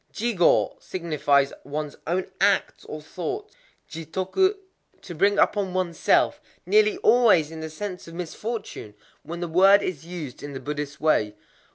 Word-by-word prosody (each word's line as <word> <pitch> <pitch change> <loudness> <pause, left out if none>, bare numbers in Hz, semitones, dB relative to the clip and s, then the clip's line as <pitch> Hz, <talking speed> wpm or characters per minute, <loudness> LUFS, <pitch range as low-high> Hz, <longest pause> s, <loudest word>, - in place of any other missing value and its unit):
Jigō 220 -6 +2
signifies 145 -5 0
ones 150 +1 -5
own 185 +3 -1
acts 200 0 +1
or 155 - -7
thoughts; 390 - -5 0.3
jitoku, 190 - -1 0.5
to 175 - -8
bring 200 +5 +2
upon 195 -3 +1
oneself,—nearly 370 - +1
always 215 -11 +5
in 160 - -8
the 160 0 -5
sense 180 +3 -7
of 165 - -10
misfortune, 180 - -6 0.3
when 170 +1 -7
the 175 - -2
word 195 +4 +5
is 165 -6 -4
used 165 -7 -8
in 145 -1 -7
the 135 - -5
Buddhist 145 0 -5
way. 105 -9 +1
175 Hz, 140 wpm, -25 LUFS, 155-200 Hz, 0.5 s, always